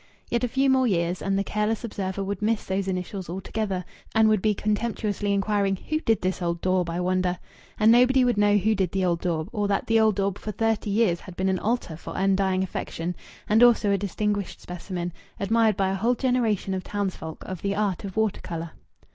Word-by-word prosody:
Yet 235 0 +1
a - - +3
few 265 +3 +1
more 260 -1 +4
years, 175 -3 0
and 195 0 0
the 200 - +1
careless 210 +3 -1
observer 195 -3 -3
would 200 0 -4
miss 215 +1 0
those 190 0 -1
initials 185 0 -4
altogether 190 0 -3 0.3
and 220 0 +5
would 215 -3 +3
be 215 0 +2
contemptuously 210 -1 -1
inquiring, 200 -1 +1
"Who 310 +11 -3
did 225 - +1
this 185 0 -1
old 170 -1 -1
daub, 185 -1 +1
I 170 +1 -2
wonder?" 180 0 0 0.4
And 220 +1 +6
nobody 250 +2 +5
would 245 - +2
know 205 0 +4
who 215 +3 +2
did 190 -4 -1
the 190 -1 +1
old 170 -1 0
daub, 160 -3 -1
or 210 -3 -1
that 200 -1 0
the 225 0 +3
old 220 -2 +4
daub 195 0 -1
for 215 - -4
thirty 225 0 0
years 200 -4 +2
had 185 - -11
been 190 +1 0
an 190 -1 0
altar 220 -6 -1
for 160 - -8
undying 190 -1 +2
affection, 175 -1 -4 0.3
and 215 +2 +4
also 235 -4 +5
a 200 - +3
distinguished 205 0 -2
specimen 175 -1 -5 0.3
admired 220 0 +2
by 195 -2 +2
a - - -1
whole 230 +6 +1
generation 235 -7 0
of 185 -1 -3
townsfolk 190 -6 -4
of 185 -3 -6
the 200 0 -1
art 200 -3 -1
of 195 0 -7
water 220 -2 +1
colour. 165 -1 -5
200 Hz, 215 wpm, -25 LUFS, 185-220 Hz, 0.4 s, And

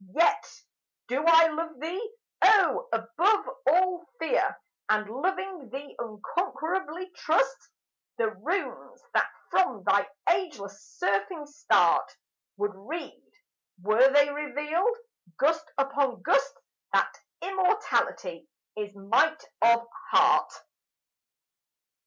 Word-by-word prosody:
Yet 335 - +3 0.6
do 265 +4 0
I 330 0 +8
love 320 -2 -5
thee, 375 +9 -5 0.3
O, 430 +4 +4
above 355 - +1 0.2
all 365 -1 +2
fear, - - 0 0.3
And 215 0 +2
loving 365 - -3
thee 275 +4 -8
unconquerably 345 - -4
trust 275 -6 0 0.5
The 225 -1 0
runes 380 - -4
that - - +2 0.2
from 375 -1 +1
thy - - +2 0.2
ageless 245 - -2
surfing 290 - -1
start 290 - +2 0.4
Would 205 +1 -1
read, 235 - -9 0.5
were 215 +8 +4
they 285 0 +4
revealed, 300 - -1 0.4
gust 320 +2 +1
upon 275 -2 0
gust, 275 0 +1 0.4
That - - +2 0.3
Immortality 390 +6 -1 0.3
is 205 -1 -6
might 230 +11 +2 0.2
of 235 0 +4 0.2
heart! - - +4
305 Hz, 100 wpm, -27 LUFS, 235-370 Hz, 0.6 s, I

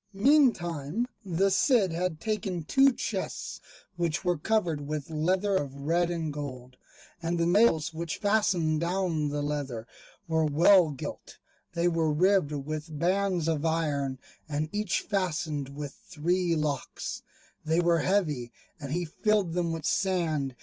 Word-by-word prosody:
Meantime 200 - +2 0.2
the 195 +1 +1
Cid 200 - +3
had 170 -1 -2
taken 195 -4 -2
two 270 - +5
chests, - - -4 0.4
which 170 +1 -1
were 175 0 +2
covered 165 -5 0
with 150 0 -4
leather 185 +6 +1
of 140 -6 -1
red 165 +5 +1
and 165 -3 -2
gold, 130 -4 -7 0.5
and 170 +1 -1
the 170 - +1
nails 175 -4 +3
which 165 0 -4
fastened 195 -7 +2
down 170 -4 0
the 145 0 -2
leather 140 -6 -3 0.4
were 160 -1 +2
well 165 +4 +5
gilt; 140 -3 -7 0.4
they 170 0 +1
were 165 -2 +1
ribbed 180 0 +3
with 150 +2 -5
bands 180 0 +1
of 160 -2 0
iron, 150 -5 0 0.3
and 150 +1 -2
each 210 -3 0
fastened 160 -8 -2
with 140 0 -6 0.2
three 175 +2 0
locks; 150 -4 -3 0.4
they 160 +1 +1
were 170 -1 +3
heavy, 155 -11 0 0.3
and 140 -2 -5
he 175 +1 -1
filled 200 +1 0
them 175 -1 0
with 165 -2 -4
sand. 160 -8 0
165 Hz, 145 wpm, -28 LUFS, 150-185 Hz, 0.5 s, two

